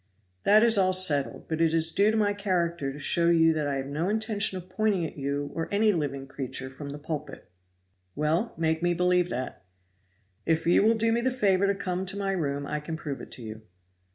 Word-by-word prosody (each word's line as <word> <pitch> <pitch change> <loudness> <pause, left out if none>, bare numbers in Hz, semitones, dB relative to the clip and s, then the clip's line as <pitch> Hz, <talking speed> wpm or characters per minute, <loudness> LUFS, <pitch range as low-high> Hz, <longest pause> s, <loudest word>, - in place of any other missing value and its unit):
"That 215 +2 +6
is 230 -3 +4
all 185 -1 +3
settled; 155 -7 +3
but 160 0 -2
it 165 0 +3
is 165 0 +1
due 200 +5 +3
to 220 - +1
my 205 -1 +2
character 170 -7 -1
to 140 - -9
show 170 +4 0
you 165 -1 +4
that 155 -2 -1
I 140 - -1
had 135 +1 -4
no 160 +6 -1
intention 215 -3 0
of 180 0 -9
pointing 190 -2 0
at - - -7
you 140 0 -3
or 165 - -4
any 210 +1 +3
living 140 -5 -3
creature 130 -1 -6
from 140 +2 -8
the 145 - -6
pulpit." 150 - -7 0.6
"Well, 160 +9 0
make 160 0 0
me 175 0 +1
believe 180 0 +2
that." 130 - -5 0.8
"If 160 0 0
you 170 - +4
will 225 +2 +4
do 225 +1 +1
me 235 +1 +1
the 260 - +1
favor 200 -6 +2
to 200 - +1
come 185 -1 -3
to 195 +2 -4
my 195 -1 -1
room 145 -6 -2
I 150 +1 -3
can 160 +2 -6
prove 145 -4 -6
it - - -10
to 125 - -9
you." 110 0 -8
170 Hz, 225 wpm, -27 LUFS, 145-200 Hz, 0.8 s, That